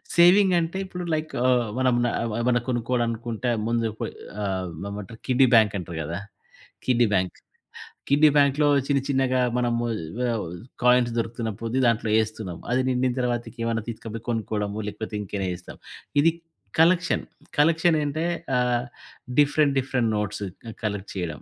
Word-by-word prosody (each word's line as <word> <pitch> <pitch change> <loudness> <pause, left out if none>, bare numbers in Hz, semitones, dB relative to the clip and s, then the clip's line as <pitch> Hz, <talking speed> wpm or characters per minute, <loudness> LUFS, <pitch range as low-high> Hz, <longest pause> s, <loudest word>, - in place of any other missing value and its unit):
Saving 185 +2 +6
అంటే, 170 +2 -2
ఇప్పుడు 180 -1 -6
like 155 0 -2
ఆహ్, 125 -3 +3
మనం 130 -1 +3
న - - +2 0.3
ఏమైనా 120 0 +2
కొనుక్కోవాలనుకుంటే 120 -1 -1 0.2
ముందు 115 -1 +1
పొయ్ - - -2 0.3
ఆహ్, 95 -2 -2 0.2
ఏమంటారు 105 +2 -8
కిడ్డీ 130 0 +5
బ్యాంక్ 110 -3 +5
అంటరు 85 -2 -7
కదా! 85 +5 -4 0.7
Kiddy 120 -2 +3
bank! 95 -1 0 0.7
కిడ్డీ 150 +2 +6
బ్యాంక్‌లో 145 +1 +4 0.2
చిన్నచిన్నగా 135 -2 +1 0.2
మనము 120 -1 0 0.5
ఆహ్, 115 -3 -1 0.4
కాయిన్స్ 125 -1 +4
దొరుకుతున్న 115 0 -3
పొద్ది 115 +3 -1
దాంట్లో 115 -2 +1
ఏస్తున్నాం. 110 -5 -5
అది 130 +1 +2
నిండిన 125 0 +1
తర్వాతకి 120 0 -2
ఏమైనా 115 -1 -1
తీసుకపోయి 115 0 -7
కొనుక్కోవడము, 105 -2 -2
లేకపోతే 110 +1 -6
ఇంకైనా 100 -1 -3
జేస్తాం. 90 0 -10 0.4
ఇది 165 +3 +5 0.5
కలెక్షన్, 170 +1 +3 0.3
కలెక్షనేంటే 160 -1 +2 0.3
ఆహ్, 125 0 +1 0.5
డిఫరెంట్, 145 -1 +4
డిఫరెంట్ 125 -3 0
నోట్స్ 105 0 -3 0.2
క 115 - -7
కలెక్ట్ 105 -2 -3
చేయడం. 85 -7 -4
120 Hz, 135 wpm, -25 LUFS, 110-135 Hz, 0.7 s, Saving